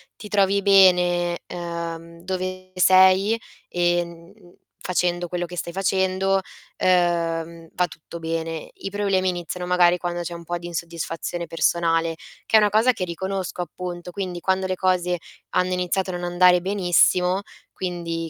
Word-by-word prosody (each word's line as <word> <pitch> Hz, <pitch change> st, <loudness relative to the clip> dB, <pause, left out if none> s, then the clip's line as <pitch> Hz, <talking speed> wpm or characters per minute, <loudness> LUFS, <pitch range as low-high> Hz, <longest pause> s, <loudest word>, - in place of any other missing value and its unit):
ti 210 Hz, -, -10 dB
trovi 200 Hz, -1 st, +2 dB
bene, 180 Hz, -3 st, +4 dB
uhm, 170 Hz, -1 st, -6 dB
dove 185 Hz, 0 st, -4 dB
sei, 190 Hz, +4 st, +5 dB, 0.3 s
e, 175 Hz, 0 st, +1 dB
mhmm, 170 Hz, +1 st, -13 dB, 0.5 s
facendo 175 Hz, -1 st, 0 dB
quello 175 Hz, 0 st, -2 dB
che 175 Hz, +1 st, -9 dB
stai 170 Hz, 0 st, -4 dB
facendo, 190 Hz, 0 st, +1 dB, 0.4 s
uhm, 170 Hz, -2 st, +1 dB
va 180 Hz, 0 st, +1 dB
tutto 165 Hz, +1 st, -11 dB
bene. 165 Hz, 0 st, -4 dB
I -, -, -6 dB
problemi 195 Hz, -2 st, +1 dB
iniziano, 180 Hz, 0 st, -4 dB
magari, 180 Hz, -1 st, +4 dB
quando 175 Hz, 0 st, -3 dB
c'è 175 Hz, 0 st, -5 dB
un 170 Hz, 0 st, -8 dB
po' 175 Hz, +1 st, -3 dB
di 175 Hz, 0 st, -8 dB
insoddisfazione 170 Hz, 0 st, -4 dB
personale, 165 Hz, 0 st, +1 dB, 0.3 s
che 220 Hz, -, +5 dB
è -, -, +8 dB
una 210 Hz, -1 st, +3 dB
cosa 220 Hz, +5 st, +4 dB
che 205 Hz, -7 st, -3 dB
riconosco, 185 Hz, +1 st, -4 dB
appunto. 175 Hz, +1 st, -6 dB
Quindi, 180 Hz, -2 st, -5 dB
quando 190 Hz, +1 st, 0 dB
le 185 Hz, 0 st, -1 dB
cose 180 Hz, -1 st, +1 dB, 0.3 s
hanno 185 Hz, 0 st, +1 dB
iniziato 180 Hz, +1 st, -1 dB
a -, -, -4 dB
non 175 Hz, -, -7 dB
andare 180 Hz, 0 st, +5 dB
benissimo 180 Hz, 0 st, +2 dB, 0.3 s
quindi, 170 Hz, -2 st, -4 dB
180 Hz, 150 wpm, -23 LUFS, 170-185 Hz, 0.5 s, è